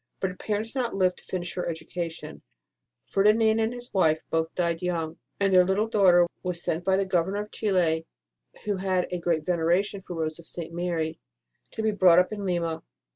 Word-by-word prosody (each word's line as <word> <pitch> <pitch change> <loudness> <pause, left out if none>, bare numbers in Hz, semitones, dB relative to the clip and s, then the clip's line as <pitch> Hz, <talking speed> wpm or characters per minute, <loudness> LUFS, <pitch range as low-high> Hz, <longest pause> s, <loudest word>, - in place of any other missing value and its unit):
But 190 - -1
her - - -10
parents 215 +3 -3
did 265 - -2
not 240 -4 -1
live 185 -2 +2
to - - -17
finish 175 -2 -4
her 180 - -3
education, 165 +1 -6 0.6
Ferdinand 220 +2 +3
and 220 +1 +1
his 245 0 -8
wife 160 -5 +2
both 160 0 -1
died 170 -2 0
young, 170 -2 -2 0.2
and 195 -1 +2
their 180 0 +7
little 190 +4 +1
daughter 185 -5 +5 0.2
was 180 -2 -3
sent 165 +2 -1
by 190 +1 +2
the 195 - +1
Governor 190 +2 0
of 210 - -9
Chili, 170 -6 +1 0.6
who 205 -2 0
had 185 -1 0
a 180 - -2
great 165 -3 0
veneration 180 +3 +1
for 180 - -8
Rose 160 0 -2
of 170 - -14
St. 165 -1 -6
Mary, 165 -2 -2 0.5
to 220 - -3
be 220 - +2
brought 185 -4 +5
up 180 +4 +3
in 205 -1 -5
Lima. 170 -3 -1
180 Hz, 200 wpm, -26 LUFS, 170-200 Hz, 0.6 s, their